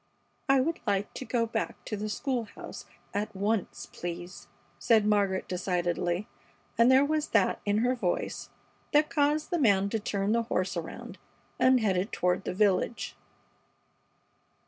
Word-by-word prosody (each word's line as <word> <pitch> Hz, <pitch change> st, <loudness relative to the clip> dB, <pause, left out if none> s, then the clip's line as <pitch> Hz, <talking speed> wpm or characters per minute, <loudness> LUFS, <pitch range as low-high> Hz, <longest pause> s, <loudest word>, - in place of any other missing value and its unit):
"I 270 Hz, 0 st, +6 dB
would 325 Hz, +5 st, -1 dB
like 200 Hz, 0 st, 0 dB
to 260 Hz, -, -6 dB
go 235 Hz, -2 st, +1 dB
back 225 Hz, -1 st, -4 dB
to 215 Hz, -, -3 dB
the 210 Hz, +1 st, -4 dB
school 245 Hz, +2 st, -2 dB
house 205 Hz, -, -10 dB, 0.3 s
at 205 Hz, 0 st, -2 dB
once, 205 Hz, +1 st, -1 dB
please," 175 Hz, +1 st, -7 dB, 0.3 s
said 220 Hz, -3 st, +4 dB
Margaret, 200 Hz, -3 st, +1 dB
decidedly, 175 Hz, 0 st, -1 dB, 0.5 s
and 235 Hz, +2 st, +5 dB
there 265 Hz, +2 st, +6 dB
was 310 Hz, +1 st, 0 dB
that 215 Hz, -4 st, +2 dB
in 205 Hz, 0 st, +2 dB
her 250 Hz, -, +3 dB
voice 195 Hz, -8 st, -2 dB, 0.4 s
that 300 Hz, +1 st, +4 dB
caused 300 Hz, +2 st, +1 dB
the 345 Hz, -, +1 dB
man 200 Hz, -7 st, +3 dB
to 225 Hz, -, -1 dB
turn 200 Hz, -1 st, -1 dB
the 230 Hz, +1 st, +3 dB
horse 195 Hz, -5 st, -1 dB
around 165 Hz, -1 st, -7 dB, 0.4 s
and 255 Hz, -1 st, +5 dB
head 195 Hz, -4 st, +2 dB
it 190 Hz, +5 st, -1 dB
toward 180 Hz, +2 st, 0 dB
the -, -, -2 dB
village. 205 Hz, +3 st, +1 dB
210 Hz, 155 wpm, -29 LUFS, 190-250 Hz, 0.5 s, I